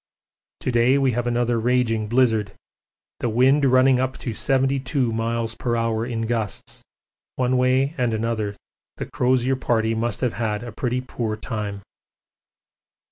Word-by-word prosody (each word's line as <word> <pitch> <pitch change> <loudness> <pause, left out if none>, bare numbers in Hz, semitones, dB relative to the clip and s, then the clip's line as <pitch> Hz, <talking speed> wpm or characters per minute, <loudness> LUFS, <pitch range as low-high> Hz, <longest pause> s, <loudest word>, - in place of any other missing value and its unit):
To - - -1
day 120 +3 +4
we 135 -2 +2
have 120 +1 -2
another 120 -1 +1
raging 115 -2 +1
blizzard 110 -4 +2 0.7
the 120 - -1
wind 130 +5 +4
running 130 0 +4
up 130 0 -1
to 120 - -4
72 135 0 +1
m.p.h. 115 0 -1
in 115 -1 -2
gusts 115 -3 -3 0.5
one 130 0 +1
way 130 +3 +2
and 120 -2 +1
another 110 -2 -2 0.4
the - - -4
Crozier 130 +1 +1
Party 115 -3 +1
must 115 +1 -2
have 125 -3 0
had 110 -2 -2
a 120 - -7
pretty 125 +3 -2
poor 115 -4 -3
time. 105 -3 -5
120 Hz, 135 wpm, -23 LUFS, 115-130 Hz, 0.7 s, day